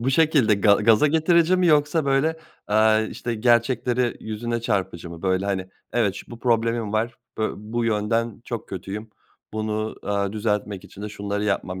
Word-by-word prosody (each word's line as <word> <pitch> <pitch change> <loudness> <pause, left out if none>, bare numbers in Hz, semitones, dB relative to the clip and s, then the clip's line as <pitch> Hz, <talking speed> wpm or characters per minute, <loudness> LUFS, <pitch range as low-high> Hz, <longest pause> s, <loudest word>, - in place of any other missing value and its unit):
bu 125 +3 0
şekilde 140 -7 +4
ga 100 0 +5
gaza 115 +7 +4
getirici 165 +3 +3
mi 180 - +2
yoksa 150 0 +3
böyle, 140 +4 +1 0.3
aaa, 110 +1 +4
işte, 115 +2 -4
gerçekleri 120 +1 +2
yüzüne 115 +2 -3
çarpıcı 95 -6 -2
mı? 85 -1 -10
Böyle, 95 0 +1
hani, 95 -2 -1 0.3
"Evet, 110 -5 +1
ş - - -8
bu 120 - -9
problemim 115 -2 0
var. 115 +2 0 0.2
Bö 110 - 0
bu 115 +3 -3
yönden 115 +1 0
çok 115 -2 -5
kötüyüm. 100 +4 -6 0.4
Bunu, 110 0 -2
aaa, 100 -1 -1
düzeltmek 105 -2 -2
için 100 - -12
de 105 - -4
şunları 100 0 -3
yapmam 95 -2 -2
110 Hz, 170 wpm, -23 LUFS, 105-120 Hz, 0.4 s, ga